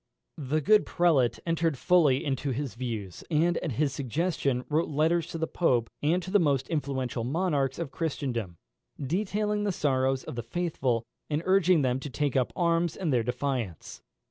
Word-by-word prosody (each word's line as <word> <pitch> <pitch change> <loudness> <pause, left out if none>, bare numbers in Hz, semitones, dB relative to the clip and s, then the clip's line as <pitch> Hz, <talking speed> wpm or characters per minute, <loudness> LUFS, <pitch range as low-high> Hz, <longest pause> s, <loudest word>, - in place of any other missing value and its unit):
The 150 +2 -1
good 215 +8 +4
prelate 155 -9 +2
entered 165 -3 0
fully 150 -5 +3
into 140 0 -1
his 135 0 -3
views, 115 -7 -5
and, 170 +2 +2
at 160 -7 -3
his 140 +3 0
suggestion, 140 -1 -1
wrote 155 +3 0
letters 160 +3 +1
to 170 - -5
the 160 - 0
Pope, 125 -9 +1
and 170 +5 +1
to 185 - -6
the 205 - +5
most 140 -6 +1
influential 130 -6 -2
monarchs 140 -1 0
of 165 -5 -4
Christendom, 125 - -3 0.4
detailing 205 +7 -1
the 205 - +1
sorrows 135 -5 +1
of - - -7
the 120 - -3
faithful, 125 -4 -1 0.2
and 150 +1 -1
urging 185 -4 +4
them 130 0 +1
to 145 - -6
take 145 0 -1
up 130 -2 +1
arms 170 -1 +1
in 175 -5 -2
their 125 -3 +3
defence. 125 - -3
145 Hz, 170 wpm, -28 LUFS, 130-170 Hz, 0.4 s, the